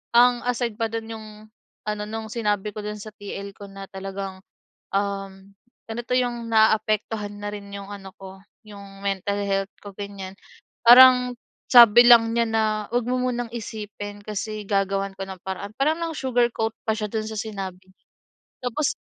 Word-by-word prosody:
ang 245 0 +6
aside 240 -2 -1
pa 225 - +1
do'n 225 0 -4
'yong 220 -1 -9 0.6
ano 210 0 -2
no'ng 220 0 -5
sinabi 210 -3 -1
ko 215 - -4
dun 210 0 -5
sa 215 - -8
TL 200 0 -7
ko 200 - -9
na 195 0 -9
talagang, 195 0 -6 0.6
um, 195 -1 -3 0.4
ano 225 +1 -4
'to 250 - -2
yung 240 -2 -1
naaapektuhan 215 -1 +2
na 205 - -3
rin 200 -1 -8
'yong 200 0 -7
ano 195 -2 -9
ko 190 0 -10 0.3
yung 200 -1 -12
mental 200 +1 -1
health 195 0 -1
ko, 205 - -8
ganyan. 195 -1 -7 0.5
Parang 250 0 +8 0.3
sabi 240 -1 +9
lang 230 -1 +7
niya 235 - +3
na, 225 0 +1 0.3
"Huwag 245 - +2
mo 255 +1 +1
munang 245 -2 -1
isipin 205 -2 -7
kasi 215 0 -4
gagawan 195 -1 0
ko 195 - -3
ng 190 -1 -8
paraan." 195 +2 -5
Parang 305 +4 +2
nang 330 -1 -3
sugarcoat 240 -3 +1 0.2
pa 220 - +3
siya 215 -1 -2
do'n 220 -1 -2
sa 220 - -6
sinabi 195 -4 -5
niya. 190 - -28 0.6
Tapos, 265 +5 0
210 Hz, 170 wpm, -24 LUFS, 195-235 Hz, 0.6 s, sabi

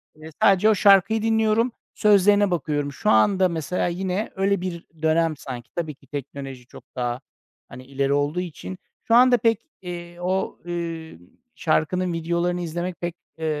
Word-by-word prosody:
iii, 155 +1 -11
sadece 200 +2 +5
o 215 - +4
şarkıyı 200 +2 +5
dinliyorum. 220 +1 +2 0.2
Sözlerine 205 -1 +4
bakıyorum. 145 -3 -1
Şu - - -1
anda 185 - +4
mesela 170 +2 -1
yine 185 +4 -2
öyle 195 -1 +1
bir 175 -2 -5 0.2
dönem 160 -1 +2
sanki. 125 -5 -8
Tabii 160 -4 -3
ki 140 - -25
teknoloji 135 -2 -7
çok - - -13
daha, 125 +1 -2 0.5
hani, 130 +1 -11
ileri 140 +1 -1
olduğu 145 +4 0
için. 120 - -7 0.3
Şu 230 - +3
anda 250 0 +7
pek, 225 0 +1 0.2
eee, 175 -1 -8
o, 185 +2 -1
eee, 165 - -5 0.4
şarkının 175 +2 0
videolarını 170 +2 -1
izlemek 175 +2 -4
pek, 175 0 -3 0.2
eee, 160 - -4
175 Hz, 155 wpm, -23 LUFS, 150-195 Hz, 0.5 s, anda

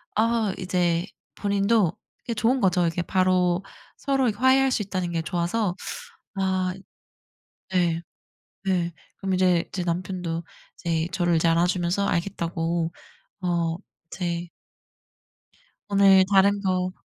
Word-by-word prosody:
아 220 -2 +2
이제 180 -1 0 0.3
본인도 200 -2 +2 0.3
이게 235 - -3
좋은 235 +4 +2
거죠. 180 -3 +3
이게 165 +2 -1
바로 185 0 +2 0.3
서로 270 -2 +1
이렇게 205 - -4
화해할 265 0 +5
수 220 - +1
있다는 185 -3 -3
게 165 -1 -1
좋아서 175 +4 -1 0.6
아 190 -1 0 1.0
네. 170 -2 +1 0.6
네 175 -3 0 0.2
그럼 195 -1 -2
이제 180 -2 +2
제 185 - -2
남편도 175 -1 -3 0.3
이제 165 -1 -1
저를 175 -2 +1
이제 165 +1 +2
안아 170 +1 +3
주면서 180 +2 0
알겠다고 170 -2 -1 0.5
어 170 -2 0 0.3
이제 175 -1 -3 1.4
오늘 195 -1 +6
다른 200 +1 +4
거 185 -1 0
185 Hz, 230 characters per minute, -25 LUFS, 170-200 Hz, 1.4 s, 오늘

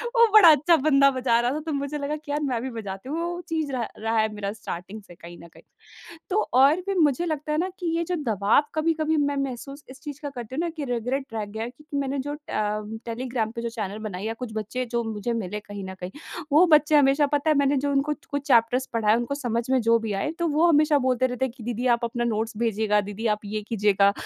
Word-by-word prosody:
वो 465 0 +7
बड़ा 415 -6 +9
अच्छा 305 +3 +4
बंदा 275 -1 +4
बजा 250 -3 +2
रहा 240 +1 +1
था 295 - -2
तो 320 - -2
मुझे 280 +1 -3
लगा 290 +1 -2
कि 300 -1 -9
यार 295 +1 -1
मैं 250 -5 -1
भी 265 - -3
बजाती 195 +3 -7
हूँ। 305 - -2
तो 335 - -1
वो 350 0 -4
चीज़ 315 -3 -1
रहा 245 -4 -2
रहा 225 +1 -1
है 215 0 +1
मेरा 200 -1 -4
स्टार्टिंग 205 0 -7
से 175 - -15
कहीं 170 0 -12
न 170 - -12
कहीं। - - -17 0.7
तो 410 +3 +2 0.2
और 295 +6 +5
भी 395 - -1
मुझे 305 +2 +2
लगता 305 -2 -3
है 305 - 0
न 365 +3 0
कि 355 - -3
ये 335 - 0
जो 360 +1 -2
दवाब 210 +8 +3
कभी-कभी 315 0 +1
मैं 285 -1 +1
महसूस 275 +2 -7
इस 265 +1 -12
चीज़ 290 -2 -7
का 290 - -4
करती 245 -2 -8
हूँ 330 - 0
न - - -2
कि 300 - -3
रिग्रेट 250 +2 -2
रह 220 -1 -2
गया 215 +2 -6
है 235 - -4
क्योंकि 295 +3 -9
मैंने 275 0 -1
जो 290 +2 -3
ट - - -9
अ, 210 0 -1 0.2
टेलीग्राम 235 -1 -2
पे 235 -1 -6
जो 235 - -2
चैनल 210 -3 -5
बनाए 185 -2 -6
या 225 +1 -2
कुछ 245 0 -7
बच्चे 220 +4 -3
जो 235 0 +1
मुझे 220 +1 -3
मिले 210 -3 -3
कहीं 205 -1 -8
न - - -7
कहीं। 180 0 -5 0.4
वो 310 +5 +7
बच्चे 305 -2 +4
हमेशा 285 +1 +4
पता 290 +2 0
है 305 - +3
मैंने 280 0 +3
जो 285 +1 0
उनको 280 +2 +1
च 295 - -26
कुछ 285 -1 -2
चैप्टर्स 245 +1 +3
पढ़ाएँ, 220 -1 +3
उनको 240 +3 -2
समझ 240 -5 -1
में 260 -1 +3
जो 230 +1 +4
भी 225 -2 -4
आए 200 +9 -1
तो 340 - 0
वो 310 +3 +3
हमेशा 300 -2 +4
बोलते 255 -1 +1
रहते 250 +1 -2
हैं 260 - -3
कि 245 - -11
दीदी 240 +1 -3
आप 240 -1 +2
अपना 240 +1 -2
नोट्स 225 -1 -2
भेजिएगा, 220 -2 +1
दीदी 205 +3 -5
आप 210 -1 +1
ये 210 +1 -3
कीजियेगा। 200 -2 +3
255 Hz, 260 wpm, -25 LUFS, 220-290 Hz, 0.7 s, बड़ा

